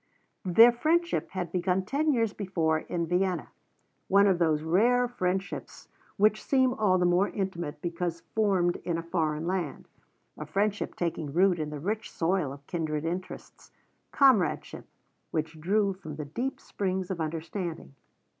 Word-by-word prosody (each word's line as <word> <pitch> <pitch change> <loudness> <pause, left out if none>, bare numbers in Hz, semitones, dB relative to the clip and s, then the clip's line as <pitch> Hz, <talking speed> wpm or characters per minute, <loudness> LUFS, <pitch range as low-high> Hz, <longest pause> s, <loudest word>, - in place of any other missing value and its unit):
Their 225 +7 +7
friendship 335 +8 0
had 180 -3 -4
begun 180 +1 0
ten 295 +8 +1
years 230 -5 +1
before 165 -6 0
in 170 +1 -3
Vienna, 180 0 0 0.6
one 200 +1 +5
of 190 -3 +3
those 155 -3 +2
rare 235 +9 +3
friendships 190 -4 -3 0.3
which 215 +1 +3
seem 260 -2 +3
all 205 -6 +2
the 180 - +2
more 175 +3 +3
intimate 175 -6 -4
because 170 -1 -3
formed 190 -5 +2
in 170 -2 -3
a 165 - -4
foreign 160 -2 -1
land; 175 -5 -3 0.5
a 150 - -6
friendship 200 +5 -1
taking 165 -4 -3
root 180 +2 +3
in 155 -1 -2
the 150 -1 -6
rich 205 +8 -3
soil 165 -4 0
of 140 0 -11
kindred 155 -2 -2
interests, 180 +3 -6 0.4
comradeship 255 - +2 0.4
which 160 0 -3
drew 200 +3 +2
from 155 -5 -9
the 150 0 -5
deep 245 - -3
springs 190 -1 -3
of 175 -3 -3
understanding. 165 - -4
180 Hz, 150 wpm, -28 LUFS, 165-205 Hz, 0.6 s, Their